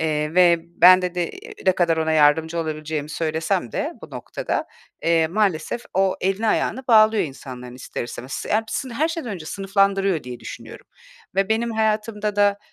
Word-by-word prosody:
eee, 155 0 -1
ve 175 -2 +6
ben 175 +2 +5
dedi 180 -1 -2 0.4
ne 185 - +6
kadar 170 -2 +1
ona 160 0 0
yardımcı 160 +2 +3
olabileceğimi 155 -2 -3
söylesem 160 - -1
de - - -2
bu - - -10
noktada, - - -4 0.4
eee, 165 -1 +3
maalesef 190 +2 -1
o 190 0 +2
elini 195 +4 0
ayağını 250 +3 0
bağlıyor 215 -3 +5
insanların 125 -3 -9
ister 125 -1 -6
istemez. 125 +2 -6
Hepsi 225 +5 -1
her 285 +7 0
şeyden 325 -8 -4
önce 175 -6 -6
sınıflandırıyor 195 -2 +1
diye 125 -1 -8
düşünüyorum - - -10 0.5
ve 195 +1 +1
benim 230 +2 0
hayatımda 215 -1 -1
da, 205 0 +3
180 Hz, 155 wpm, -22 LUFS, 160-210 Hz, 0.5 s, ve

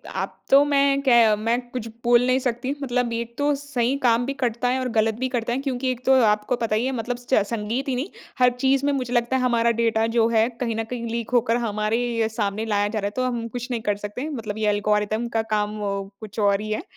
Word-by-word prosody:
अब - - -3 0.2
तो 275 +1 +7
मैं 280 -1 +2
क्य 235 -5 +5
मैं 230 +3 0
कुछ 240 -2 -5 0.2
बोल 240 0 +4
नहीं 255 +1 +2
सकती, 250 0 -2
मतलब 245 -3 -1
1 235 0 -4
तो 290 0 +2
सही 275 -2 -1
काम 240 -2 +2
भी 275 - -2
करता 240 0 0
है 255 +1 +1
और 255 -1 -2
गलत 220 0 +2
भी 260 0 -1
करता 240 -2 -2
है 255 - -1
क्योंकि 260 -2 -1
1 250 0 -7
तो 265 - +5
आपको 210 +3 +1
पता 230 -3 -1
ही 225 +3 0
है 265 - 0
मतलब 240 +1 -3
स्च 245 +1 -6
संगीत 230 +4 -3
ही 260 - 0
नहीं। 270 +9 -3 0.3
हर 250 0 +6
चीज़ 270 +1 +2
में 285 - +2
मुझे 250 -3 -2
लगता 240 +1 +1
है - - -1
हमारा 235 -2 +2
डाटा 225 -1 +2
जो 225 -1 +5
है 225 -1 +3
कहीं 230 -3 -1
न 225 - -1
कहीं 240 -2 -4
लीक 230 -1 -3
होकर 235 -1 +3
हमारे 215 +1 0
ही 230 -2 0
सामने 215 -1 -2
लाया 205 -2 +1
जा 215 +1 -2
रहा 200 - -3
है - - -4
तो 255 - 0
हम 240 -2 -2
कुछ 245 +2 -6
नहीं 235 -2 -2
कर 205 -1 0
सकते। 250 +9 -5
मतलब 225 -7 -5
ये 215 -1 +1
एल्गोरिदम 210 +2 0
का - - +3
काम 210 0 -1 0.4
कुछ 215 0 -8
और 200 -1 +2
ही 215 - -5
है। 215 - 0
अ, - - -18
235 Hz, 255 wpm, -23 LUFS, 220-255 Hz, 0.4 s, तो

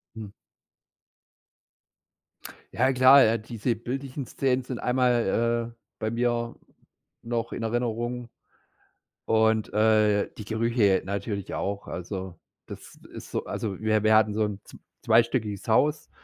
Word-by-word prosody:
Mhm. 105 -3 -8 2.4
Ja, 135 - +2
klar, 130 +2 +7
äh, 115 +1 +2
diese 115 +1 -2
bildlichen 130 +3 -5
Szenen 130 0 0
sind 125 -1 -6
einmal, 120 -2 +1
äh, 115 - -20 0.2
bei 110 0 -2
mir 120 0 -1 0.7
noch 115 0 -3
in - - -5
Erinnerung 120 +1 -2 1.0
und, 110 -1 +2
äh, 105 -1 +3
die 105 - -8
Gerüche 110 -3 +1
natürlich 100 0 -4
auch. 100 0 -4
Also, 95 -1 -6 0.3
das - - -11 0.2
ist - - -9
so - - -3
also, 100 -4 -4
wir 110 -1 +1
wir 110 0 +5
hatten 110 -1 +4
so 110 +1 0
'n 105 -2 -5
zw - - -14 0.3
zweistöckiges 115 -4 +1
Haus 150 +7 +2
115 Hz, 125 wpm, -26 LUFS, 105-120 Hz, 2.4 s, klar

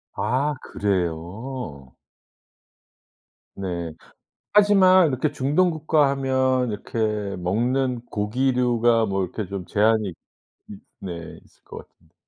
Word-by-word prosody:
아 140 +4 0
그래요? 90 - -4 1.6
네. 85 -4 -4 0.6
하지만 190 -3 +6
이렇게 140 +1 -1
중동국가 150 +1 +2
하면 130 -2 +1
이렇게 105 +2 -7 0.4
먹는 120 +7 0
고기류가 120 +1 +1
뭐 95 -2 -1
이렇게 100 +4 -4
좀 95 -1 -5
제한이 110 +1 +2
있 - - -8 0.9
네 90 -3 -4 0.3
있을 - - -28
것 - - -11
같은데. - - -32
120 Hz, 205 characters per minute, -23 LUFS, 100-135 Hz, 1.6 s, 하지만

